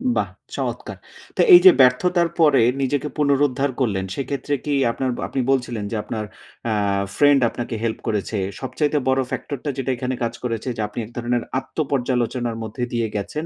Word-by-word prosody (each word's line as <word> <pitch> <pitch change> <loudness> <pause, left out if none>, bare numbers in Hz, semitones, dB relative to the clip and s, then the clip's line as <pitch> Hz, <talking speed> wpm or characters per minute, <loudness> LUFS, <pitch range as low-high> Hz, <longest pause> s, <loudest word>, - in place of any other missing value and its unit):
বাহ! - - 0 0.3
চমৎকার। - - -4 0.4
তো - - +2
এই 355 - +12
যে 375 - +12
ব্যর্থতার 170 +7 +3
পরে 150 -5 +5 0.2
নিজেকে 140 +2 0
পুনরুদ্ধার 140 -1 +2
করলেন 100 -7 0
সেক্ষেত্রে, 140 +2 -3
কি 145 - 0 0.2
আপনার 130 +1 -2 0.2
আপনি 135 - -3
বলছিলেন 120 -5 -1
যে - - -2
আপনার 110 -1 -4 0.4
অ্যা 115 - 0 0.4
ফ্রেন্ড 145 -2 +5
আপনাকে 120 -1 -5
হেল্প 110 -1 -1
করেছে। 105 -1 -1 0.2
সবচাইতে 145 +4 0
বড় 130 0 +3
ফ্যাক্টর 145 - -4
টা 145 - -2
যেটা 130 0 -1
এখানে 130 +1 -2
কাজ 115 0 -1
করেছে 115 +1 -3
যে, - - -2
আপনি 105 - -7
এক 115 - -14
ধরনের 120 0 -1 0.2
আত্ম - - -17
পর্যালোচনার 125 -2 -1
মধ্যে 110 +3 -5
দিয়ে 115 -1 0
গেছেন। 105 +11 -3
125 Hz, 175 wpm, -22 LUFS, 115-140 Hz, 0.4 s, এই